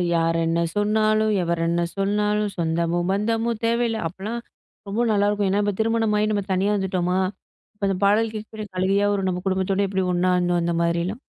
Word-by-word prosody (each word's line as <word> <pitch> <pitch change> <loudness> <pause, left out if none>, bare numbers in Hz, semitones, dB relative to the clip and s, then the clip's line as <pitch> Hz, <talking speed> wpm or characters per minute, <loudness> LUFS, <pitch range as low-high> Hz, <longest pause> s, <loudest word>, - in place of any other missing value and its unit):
"யார் 165 0 +1
என்ன 165 +1 +1
சொன்னாலும், 215 +1 +2
எவர் 170 0 -1
என்ன 170 +1 +1 0.2
சொன்னாலும் 210 +1 0
சொந்தமோ! 170 +1 0
பந்தமோ! 225 +3 0
தேவையில்ல." 230 -1 +1
அப்புட்லாம் 210 +7 -5 0.5
ரொம்ப 235 +4 0
நல்லாயிருக்கும். 205 -1 +1
ஏன்னா, 200 +2 +2
இப்ப 205 -1 0
திருமணமாகி 220 -2 +1
நம்ம 205 -1 0
தனியா 195 +3 +1
வந்துட்டோமா! 185 -1 0 0.6
இப்ப 200 -1 -2
அந்த 195 - 0
பாடல் 215 +2 +3
கேட்க 215 0 -6
கூட 215 -1 -5
அழுகையா 200 +2 +2
வரும். 195 -2 0
நம்ம 180 0 -2
குடும்பத்தோட 190 +1 +1
எப்பிடி 190 -1 -1
ஒண்ணா 180 +1 +2
இருந்தோம்! 175 -1 +1
அந்த 170 - 0
மாதிரியெல்லாம். 170 +7 -1
200 Hz, 170 wpm, -23 LUFS, 180-215 Hz, 0.6 s, பாடல்